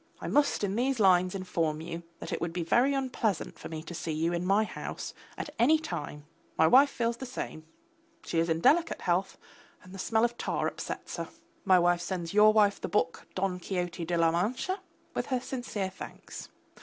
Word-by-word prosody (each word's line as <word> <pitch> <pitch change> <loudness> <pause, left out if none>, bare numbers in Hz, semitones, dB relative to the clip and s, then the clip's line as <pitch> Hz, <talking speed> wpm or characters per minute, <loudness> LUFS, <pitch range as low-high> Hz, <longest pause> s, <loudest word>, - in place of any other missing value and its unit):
I - - -5
must 285 -6 +2
in 200 0 0
these 255 +2 +1
lines 185 -2 +4
inform 165 -5 -1
you 165 +1 -6 0.2
that - - -6
it - - -3
would 170 0 -2
be 175 -1 -2
very 250 +11 +3
unpleasant 250 - -1
for - - -8
me 155 -1 -6
to 175 - -8
see 165 -1 -4
you 160 +3 0
in 175 +1 -2
my 200 +3 +4
house 215 - -6 0.2
at 295 - -5
any 285 +7 +6
time; 150 - -6 0.3
my 160 - +5
wife 270 - +7
feels 235 -2 -1
the 260 - -6
same: 160 -10 -6 0.6
she 165 - 0
is 165 +1 +1
in 165 0 0
delicate 330 - +3
health 180 +2 0 0.5
and 185 - -13
the 195 - -8
smell 225 +3 +2
of 240 0 -3
tar - - -1
upsets - - -5
her. - - -4 0.4
My 190 -1 +6
wife 175 0 +3
sends 175 -1 -4
your 210 +1 +7
wife 210 -2 +3
the - - -2
book, 165 -5 0
Don 185 -1 -1
Quixote 175 -2 -3
de 170 +1 -1
la 165 -1 +4
Mancha, 245 - -1 0.3
with - - -2
her 255 -2 0
sincere 240 -7 -4
thanks. 190 - -9
190 Hz, 205 wpm, -29 LUFS, 170-235 Hz, 0.6 s, wife